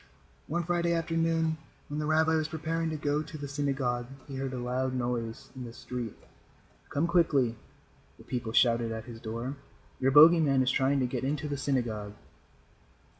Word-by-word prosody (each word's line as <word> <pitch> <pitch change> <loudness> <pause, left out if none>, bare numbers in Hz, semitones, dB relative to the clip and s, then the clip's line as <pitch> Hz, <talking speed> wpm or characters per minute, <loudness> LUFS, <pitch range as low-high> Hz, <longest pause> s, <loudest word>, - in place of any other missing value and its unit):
One 170 +3 -1
Friday 170 0 +1
afternoon 165 -1 +1 0.3
when 145 +1 -4
the 150 - -1
rabbi 160 +1 +3
was 155 -1 +1
preparing 165 +1 -2
to 155 - -3
go 145 0 0
to 155 0 -8
the 145 -1 -5
synagogue, 135 -4 -1 0.2
he 140 - -7
heard 135 -1 -2
a 130 - -4
loud 130 +1 -1
noise 120 +1 -3
in 130 - -6
the 115 -1 -8
street. 120 -2 -6 0.7
"Come 145 +3 +1
quickly," 160 -9 +3 0.6
the - - -14
people 120 -3 -3
shouted 115 0 +3
at 110 0 -5
his 120 -3 -9
door. 120 +5 -4 0.4
"Your 130 - +3
bogey 155 +5 +9
man 135 -4 +3
is 130 - +2
trying 135 +1 +2
to - - +2
get 125 - -3
into 150 +2 -1
the 145 - -2
synagogue." 120 -7 -1
135 Hz, 175 wpm, -30 LUFS, 125-155 Hz, 0.7 s, bogey